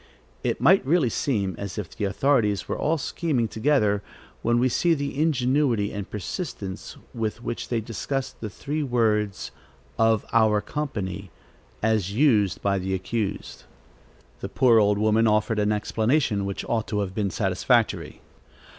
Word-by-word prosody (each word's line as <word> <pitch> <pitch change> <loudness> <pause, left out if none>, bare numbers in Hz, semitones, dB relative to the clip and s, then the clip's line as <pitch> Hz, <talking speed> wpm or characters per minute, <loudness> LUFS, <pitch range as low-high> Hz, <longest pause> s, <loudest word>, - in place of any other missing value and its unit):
It - - -1
might 190 +3 +5
really 140 -3 +2
seem 100 -9 -1
as 100 0 -6
if 105 -5 -6
the 105 - -2
authorities 105 -1 +1
were - - -2
all 160 +2 0
scheming 140 -5 -1
together, 110 -4 +1 0.4
when 120 +1 +2
we 125 +2 +3
see 165 +6 +2
the 140 0 -3
ingenuity 130 -7 +1
and 105 -2 -5
persistence 100 - -6 0.2
with 115 +1 -3
which 120 - -4
they 115 -2 0
discussed 125 +5 -4
the 110 - -4
three 145 +9 -4
words 110 -6 0 0.5
"of 115 -2 +3
our 110 -2 +4
company," 100 -9 -4 0.5
as 105 -3 +1
used 110 -7 +2
by 100 -1 +1
the 95 +1 -2
accused. 100 +3 -4 0.7
The - - -5
poor 120 -3 +4
old 105 -1 +3
woman 110 +2 +3
offered 110 +1 +1
an 105 0 +2
explanation, 110 0 +1
which 100 -1 -4
ought 115 -2 -1
to 105 -1 -1
have 95 -2 -4
been 100 -1 -1
satisfactory. 95 - 0
110 Hz, 150 wpm, -25 LUFS, 100-130 Hz, 0.7 s, might